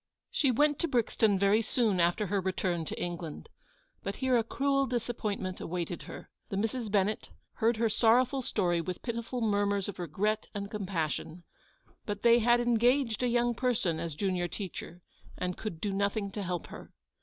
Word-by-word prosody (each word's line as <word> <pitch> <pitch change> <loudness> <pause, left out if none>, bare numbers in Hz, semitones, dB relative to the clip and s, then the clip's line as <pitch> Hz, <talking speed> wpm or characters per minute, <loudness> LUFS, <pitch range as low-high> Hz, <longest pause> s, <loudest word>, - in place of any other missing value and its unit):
She 280 - +2
went 290 +4 +3
to 340 - +1
Brixton 220 -5 +2
very 200 +3 +4
soon 220 -4 +1
after 175 +5 +2
her 195 +1 0
return 180 -3 -1
to - - -5
England; 170 -3 -5 0.5
but 195 0 -4
here 260 -1 +1
a 230 - +4
cruel 275 +3 +1
disappointment 215 -6 -2
awaited 175 0 -3
her. - - -10 0.2
The 195 - -2
Misses 225 +2 -1
Bennett 205 +1 +1 0.2
heard 230 +1 +2
her 230 +1 +2
sorrowful 245 +4 +3
story 175 -8 +1
with 180 +1 -5
pitiful 235 +1 -3
murmurs 205 -2 +1
of 200 - -6
regret 210 +6 -1
and 200 0 -4
compassion; 175 - -3 0.6
but 205 -1 -3
they 235 0 +7
had 240 +1 +4
engaged 240 +1 +2
a 250 - +2
young 240 0 +2
person 225 -9 0
as 165 -3 -4
junior 180 0 0
teacher, 175 -1 -7 0.3
and 180 0 -2
could 210 -7 -5
do 200 +2 -2
nothing 200 +1 0
to 205 - -4
help 180 -3 -3
her. - - -10
205 Hz, 170 wpm, -30 LUFS, 185-235 Hz, 0.6 s, they